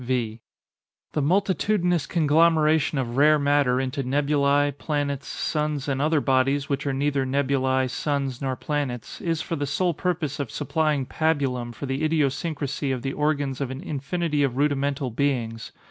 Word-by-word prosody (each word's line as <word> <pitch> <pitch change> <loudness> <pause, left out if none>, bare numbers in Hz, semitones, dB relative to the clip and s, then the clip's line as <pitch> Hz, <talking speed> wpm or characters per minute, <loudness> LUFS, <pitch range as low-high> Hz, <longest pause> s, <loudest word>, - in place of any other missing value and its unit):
V. 120 -3 -2 0.7
The 150 - -1
multitudinous 180 0 +1
conglomeration 155 -1 +3
of 125 -2 -2
rare 150 +2 +6
matter 140 -3 +2
into 135 +1 -2
nebulæ, 145 +1 +2
planets, 145 -2 -2
suns, 150 -3 -2
and 135 -1 -1
other 155 +1 +3
bodies 135 +1 +1
which 140 +1 -2
are - - +1
neither 140 0 0
nebulæ, 130 -1 +1
suns, 135 -1 -2
nor 135 -1 -1
planets, 135 -5 -4
is 165 -2 -1
for 165 - -3
the 145 -1 -2
sole 175 +5 +1
purpose 160 -4 -2
of 140 -5 -3
supplying 150 -2 0
pabulum 135 -6 0
for 120 +4 -7
the 135 +3 -2
idiosyncrasy 150 -2 -1
of 125 -2 -3
the 135 - -2
organs 145 -3 -1
of 135 - -1
an 130 +2 -6
infinity 150 0 -2
of 135 -3 0
rudimental 140 -2 0
beings. 115 -3 -1
140 Hz, 155 wpm, -25 LUFS, 130-150 Hz, 0.7 s, rare